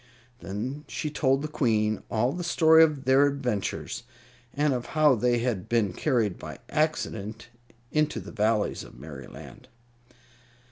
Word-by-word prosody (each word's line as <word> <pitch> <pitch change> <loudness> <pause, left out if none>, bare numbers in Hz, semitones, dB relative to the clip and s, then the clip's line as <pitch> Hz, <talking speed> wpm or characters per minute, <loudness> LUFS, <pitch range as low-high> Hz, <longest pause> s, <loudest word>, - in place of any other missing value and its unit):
Then 125 +10 -5
she 150 - -4
told 135 -1 +1
the - - -1
Queen 110 -7 +1
all 120 +3 +1
the 175 - -4
story 160 -1 +5
of 150 -4 0
their 135 +2 +5
adventures, 125 -5 -3 0.5
and 145 0 +1
of 125 -1 -3
how 150 -2 +6
they 120 +1 +2
had 115 -6 -2
been 110 -6 +1
carried 115 - 0
by - - -8
accident 115 -8 -2 0.4
into 155 0 +1
the - - -9
Valleys 110 -1 0
of - - -14
Merryland. - - -11
125 Hz, 140 wpm, -27 LUFS, 110-150 Hz, 0.5 s, how